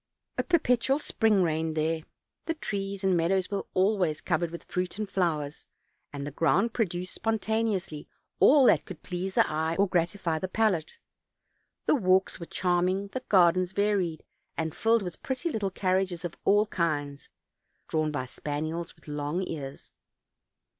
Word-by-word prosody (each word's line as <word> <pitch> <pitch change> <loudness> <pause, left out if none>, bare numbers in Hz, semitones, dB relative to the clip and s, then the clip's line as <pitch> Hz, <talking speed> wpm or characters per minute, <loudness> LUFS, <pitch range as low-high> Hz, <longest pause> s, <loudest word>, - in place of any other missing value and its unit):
A - - +2
perpetual 270 -6 +2
spring 220 -9 +2
reigned 160 -1 -1
there; 160 +1 0 0.5
the 330 - 0
trees 200 -8 -4
and 190 -1 +3
meadows 185 +3 +1
were 200 - -2
always 185 -5 +2
cov 165 -3 0
ered 170 - 0
with 170 +1 -8
fruit 180 +1 -3
and 215 -1 -2
flowers, 155 -7 -2 0.4
and 140 -1 -5
the 145 - -5
ground 195 - +2
produced 180 -5 -2
spontaneously 220 -7 -1 0.3
all 280 -1 +7
that - - +5
could 185 - -10
please 185 +1 -4
the - - +5
eye 160 +2 -1
or 200 +1 +4
gratify 175 -2 0
the 185 - -2
palate. 185 -5 0 0.9
The - - +4
walks 190 -9 +2
were 170 - -7
charming, 185 +2 0
the 255 +4 -5
gardens 185 -1 +4
varied 200 -5 0 0.3
and 160 -1 -2
filled 225 -1 +3
with 180 -2 -6
pretty 260 +5 -2
little 210 -6 -1
carriages 185 -1 0
of 170 - -4
all 205 +1 +5
kinds, 145 -7 -2 0.6
drawn 155 -1 0
by 145 -4 -3
spaniels 155 +5 -4
with - - -23
long 150 +4 -2
ears. 140 -3 -7
185 Hz, 155 wpm, -28 LUFS, 160-205 Hz, 0.9 s, all